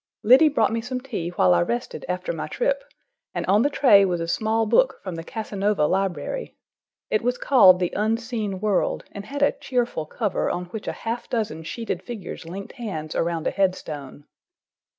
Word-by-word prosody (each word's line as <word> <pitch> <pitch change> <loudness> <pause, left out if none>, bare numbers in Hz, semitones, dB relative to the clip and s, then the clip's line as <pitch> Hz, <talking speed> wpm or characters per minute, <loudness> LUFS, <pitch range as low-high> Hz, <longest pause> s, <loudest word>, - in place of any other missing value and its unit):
Liddy 265 +8 +7
brought 230 -7 +2
me 230 - -1
some 250 +2 -4
tea 230 -10 -4
while 95 - +3
I 85 - +3
rested 120 +7 -3
after 180 0 -2
my 160 - -4
trip, - - -1 0.5
and - - -2
on 205 +3 +4
the 285 - +3
tray 250 -8 +6
was 180 -3 0
a 165 - -3
small 220 +5 +1
book - - +3
from 185 - -5
the 165 0 -6
Casanova 205 -3 -1
library. 190 - -2 0.5
It 215 - +2
was 245 +1 0
called 185 -11 +6
The 180 -2 -1
Unseen 220 -2 -1
World 205 -2 0
and 200 0 -8
had 285 +1 -2
a 285 - +5
cheerful 240 - -2
cover 210 +2 -1
on 180 0 -2
which 205 +4 -8
a - - 0
half 230 +2 -3
dozen 215 -9 -2
sheeted 225 +8 -4
figures 210 -9 -7
linked 195 +6 -7
hands 165 - -5
around 165 -1 -1
a - - +1
headstone. 150 -7 -2
205 Hz, 185 wpm, -24 LUFS, 175-235 Hz, 0.5 s, Liddy